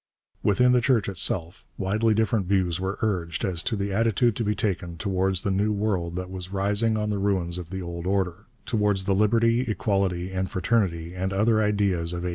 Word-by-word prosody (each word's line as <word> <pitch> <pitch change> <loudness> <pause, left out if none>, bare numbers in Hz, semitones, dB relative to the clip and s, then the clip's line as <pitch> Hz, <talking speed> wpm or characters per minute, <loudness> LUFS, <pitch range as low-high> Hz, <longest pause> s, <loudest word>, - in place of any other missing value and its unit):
Within 125 +5 +3
the 125 -1 +4
Church 120 -4 +2
itself 90 -2 0
widely 110 +3 +1
different 110 -3 +1
views 90 -3 +1
were 95 +2 -3
urged 85 -7 -1
as 90 -3 0
to 115 - -1
the 100 -1 -2
attitude 115 +2 +2
to 115 - -1
be 105 0 0
taken 90 -4 -2
towards 95 -1 0
the 100 - 0
new 100 +3 +1
world 100 -5 -1
that 90 0 -5
was 90 -1 -6
rising 100 +3 +1
on 105 0 -1
the 100 - -1
ruins 95 -3 0
of 85 -2 -8
the 95 0 -5
old 85 0 -5
order, 95 0 -1 0.2
towards 105 -4 +1
the 100 +1 +1
Liberty, 115 +4 +3
Equality, 95 -6 -1
and 95 0 -2
Fraternity 90 -4 0
and 95 +1 -2
other 110 +3 +2
ideas 100 -5 0
of 90 0 -4
'89. - - -1
95 Hz, 200 wpm, -25 LUFS, 90-105 Hz, 0.2 s, the